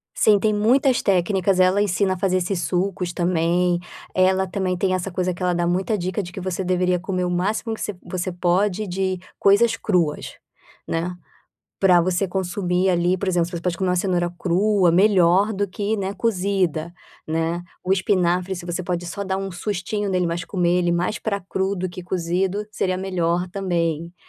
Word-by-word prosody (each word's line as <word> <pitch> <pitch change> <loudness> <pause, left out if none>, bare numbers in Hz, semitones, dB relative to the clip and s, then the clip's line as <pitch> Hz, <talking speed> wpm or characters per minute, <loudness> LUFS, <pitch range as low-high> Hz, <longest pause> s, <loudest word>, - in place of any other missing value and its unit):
Sim, 210 -2 +4
tem 215 +1 +1
muitas 250 +5 +3
técnicas, 190 0 +1
ela 185 +2 +4
ensina 195 -1 +1
a - - -5
fazer 185 0 +1
esses 180 0 -1
sucos 180 -1 -1
também, 175 0 +1 0.4
ela 190 +1 +3
também 185 0 -1
tem 185 +1 +1
essa 185 +1 -3
coisa 185 0 -1
que 180 - -7
ela 180 0 +2
dá 175 0 0
muita 190 +5 0
dica 185 +2 -2
de 175 - -8
que 190 - -7
você 185 +1 -3
deveria 180 0 +1
comer 185 0 -2
o - - -1
máximo 210 +6 -1
que - - -7
você 210 - -3
você 185 0 -3
pode 185 +4 0
de 185 0 -1 0.2
coisas 220 +3 +4
cruas, 175 -9 -1 0.5
né. 170 +2 -2 0.7
Para 180 -3 +5
você 185 +2 +1
consumir 180 0 0
ali, 175 +1 +2
por 195 - -3
exemplo, 175 -2 +1
você 175 - -5
pode 175 -1 -1
comer 190 0 0
uma 180 - +2
cenoura 175 -2 0
crua 190 +1 +2
melhor 190 +1 +4
do 200 0 -1
que 205 +3 -2
né 195 0 -2
cozida, 185 -7 -1 0.3
né. 165 +2 -1 0.2
O 185 - -1
espinafre 185 -1 +1
se 175 -1 -8
você 175 +1 -3
pode 175 0 -3
só 200 +3 -4
dar 190 0 -2
um 195 0 -4
sustinho 200 +2 -3
nele, 180 -2 +1
mas 170 +1 -2
comer 175 -2 +1
ele 175 -1 +1
mais 175 +5 -1
para 200 -2 -2
cru 190 +1 -2
do 185 0 -3
que 180 +1 -8
cozido, 185 +3 -1
seria 185 -3 -1
melhor 180 -2 -1
também. 170 -4 -2
185 Hz, 190 wpm, -22 LUFS, 175-195 Hz, 0.7 s, Para